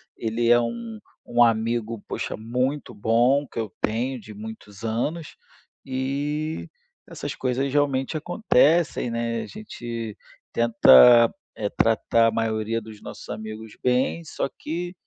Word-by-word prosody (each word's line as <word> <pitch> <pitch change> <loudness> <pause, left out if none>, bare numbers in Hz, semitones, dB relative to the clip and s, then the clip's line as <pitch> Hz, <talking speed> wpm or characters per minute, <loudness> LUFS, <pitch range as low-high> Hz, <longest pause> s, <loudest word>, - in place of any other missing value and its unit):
Ele 115 +1 -1
é 120 - +7
um 225 - -4 0.3
um 120 - +1
amigo, 115 -1 +2
poxa, - - -4
muito 125 +6 -2
bom 120 +7 +2
que - - -14
eu 110 -3 -4
tenho 120 +4 -1
de 105 -1 -11
muitos 105 -1 -10
anos, 145 +9 -2 0.5
e 145 +4 -3 0.4
essas - - -5
coisas 130 +1 -1
realmente 140 0 +1
acontecem, 160 - +2
né, 115 0 -2
a - - -9
gente 120 - -7 0.4
tenta, 115 - +7 0.2
eh, 105 -2 -2
tratar 115 +1 +2
a - - +2
maioria 110 0 -1
dos 110 -1 -12
nossos - - -10
amigos 110 0 -7
bem, 125 +6 +1
só - - -3
que 175 +3 -4
120 Hz, 130 wpm, -24 LUFS, 110-140 Hz, 0.5 s, é